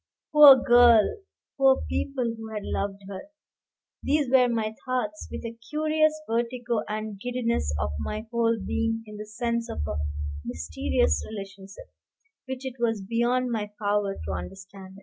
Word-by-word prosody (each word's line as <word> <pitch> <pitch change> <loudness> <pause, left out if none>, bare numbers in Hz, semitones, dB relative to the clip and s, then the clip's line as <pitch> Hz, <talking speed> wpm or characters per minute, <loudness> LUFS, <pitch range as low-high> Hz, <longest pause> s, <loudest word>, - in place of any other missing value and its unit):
Poor 300 -3 +10
girl! 240 - +5 0.4
poor 270 -1 +4
people 255 -4 -2
who 225 0 -8
had 210 -1 -5
loved 200 0 -3
her! 200 +9 -8 0.7
These 285 -3 +1
were 250 -2 +5
my 220 -2 -1
thoughts; 240 -5 -3
with - - -6
a 230 0 -7
curious 310 0 +1
vertigo 235 0 -1
and 215 -1 -4
giddiness 235 - -1
of 70 0 -1
my 215 - -4
whole 230 -1 +2
being 225 +2 -2
in 210 -1 -10
the 210 0 -7
sense 235 +1 -2
of 75 - -4
a 75 - -3 0.5
mysterious 80 -1 -1
relationship, 195 -2 -10 0.5
which 260 0 -6
it 260 -1 -6
was 225 -4 0
beyond 240 +2 +1
my 210 -3 -2
power 205 -1 0
to - - -3
understand. 195 0 -8
230 Hz, 150 wpm, -26 LUFS, 205-250 Hz, 0.7 s, Poor